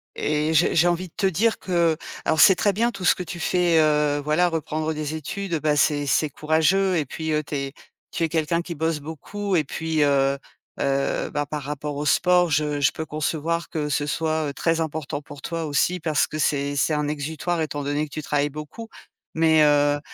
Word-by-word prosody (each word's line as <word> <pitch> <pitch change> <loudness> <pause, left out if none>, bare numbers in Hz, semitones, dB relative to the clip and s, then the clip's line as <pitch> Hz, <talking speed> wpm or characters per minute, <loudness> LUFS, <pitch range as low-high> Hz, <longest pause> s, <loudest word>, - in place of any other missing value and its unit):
et 150 +1 0
j'ai 160 +2 +3
j'ai 170 +2 +4
envie 175 +1 0
de - - -43
te 205 - -1
dire 215 +5 +1
que 170 -3 +1 0.3
alors 160 - +1
c'est 190 - +8
très 200 +3 +1
bien 230 +4 +1
tout 190 -5 -6
ce - - +6
que 180 - -5
tu 175 0 -7
fais, 175 -1 +2
heu, 150 -1 +2
voilà 155 +4 +2
reprendre 155 -1 -2
des 155 0 -4
études, 170 +3 -3
bah, 150 -1 +2
c'est 145 0 +2
c'est 155 +2 +2
courageux 160 +6 +2
et 155 - 0
puis, 160 +4 -4
heu, 150 0 0
tu 145 0 -6
es 140 -1 -3 0.4
tu 170 - -2
es 165 - +1
quelqu'un 165 +1 0
qui 170 0 -6
bosse 160 0 -1
beaucoup 185 +7 -4
et 160 - +3
puis, 160 +1 -1
heu, 140 -1 +2 0.4
heu, 140 0 0
bah, 145 -1 -1
par 150 0 -4
rapport 145 +1 -4
au 145 - -3
sport 180 +1 +3
je 150 0 +1
je 140 - +4
peux 160 - -5
concevoir 160 +3 -2
que 155 -3 -3
ce 145 0 0
soit, 155 0 -1
heu, - - -6
très 165 +3 0
important 150 -2 -4
pour 145 -2 -11
toi, 165 -1 -3
aussi, 155 +5 +1
parce 155 -2 +1
c'est 145 -1 0
c'est 145 +3 +1
un 150 0 -1
exutoire 155 +4 -3
étant 145 -2 -3
donné 145 +2 -1
que - - -18
tu 155 - -4
travailles 145 0 0
beaucoup. 150 +10 -8 0.5
Mais, 160 -1 +4
heu, 145 0 +3
155 Hz, 215 wpm, -23 LUFS, 145-170 Hz, 0.5 s, c'est